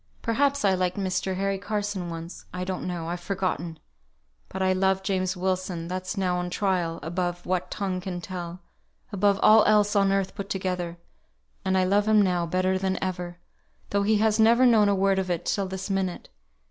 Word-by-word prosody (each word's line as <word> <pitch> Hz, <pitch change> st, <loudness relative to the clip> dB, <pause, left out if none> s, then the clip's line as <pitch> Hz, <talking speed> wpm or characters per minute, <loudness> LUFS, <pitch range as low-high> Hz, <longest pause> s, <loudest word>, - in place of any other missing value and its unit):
Perhaps 280 Hz, +2 st, +1 dB
I 195 Hz, -, +4 dB
liked 185 Hz, 0 st, 0 dB
Mr. 190 Hz, -1 st, -1 dB
Harry 195 Hz, +1 st, -1 dB
Carson 205 Hz, -3 st, -3 dB
once 165 Hz, +1 st, -8 dB
I 180 Hz, 0 st, -4 dB
don't 185 Hz, 0 st, -4 dB
know 175 Hz, -2 st, -4 dB
I've 175 Hz, +1 st, -3 dB
forgotten; 175 Hz, -3 st, -3 dB, 0.7 s
but 190 Hz, -, -6 dB
I 185 Hz, 0 st, +3 dB
loved 190 Hz, 0 st, +1 dB
James 185 Hz, -1 st, 0 dB
Wilson, 185 Hz, -2 st, -2 dB
that's 185 Hz, +3 st, -4 dB
now 180 Hz, -2 st, +1 dB
on 180 Hz, 0 st, -2 dB
trial, 175 Hz, -4 st, -1 dB
above 175 Hz, +2 st, -3 dB
what 180 Hz, 0 st, -1 dB
tongue 190 Hz, -3 st, -3 dB
can 180 Hz, -1 st, -4 dB
tell 175 Hz, -1 st, -6 dB, 0.5 s
above 200 Hz, 0 st, +2 dB
all 215 Hz, 0 st, +7 dB
else 210 Hz, 0 st, +3 dB
on 195 Hz, -1 st, +4 dB
earth 195 Hz, -1 st, 0 dB
put 200 Hz, 0 st, -6 dB
together; 180 Hz, -3 st, -3 dB, 0.7 s
and 190 Hz, 0 st, +1 dB
I 185 Hz, -, +3 dB
love 200 Hz, +3 st, +2 dB
him 215 Hz, -1 st, +5 dB
now 180 Hz, -4 st, +2 dB
better 185 Hz, +2 st, +1 dB
than 190 Hz, 0 st, -1 dB
ever, 180 Hz, -2 st, -4 dB, 0.5 s
though 200 Hz, -, +2 dB
he 210 Hz, +2 st, +3 dB
has 220 Hz, +1 st, +2 dB
never 235 Hz, +3 st, +6 dB
known 220 Hz, -4 st, +5 dB
a 200 Hz, -, +3 dB
word 195 Hz, 0 st, +2 dB
of 185 Hz, -1 st, -2 dB
it 175 Hz, -2 st, -2 dB
till 200 Hz, -2 st, 0 dB
this 190 Hz, 0 st, -5 dB
minute. 190 Hz, -2 st, -2 dB
190 Hz, 190 wpm, -26 LUFS, 180-200 Hz, 0.7 s, all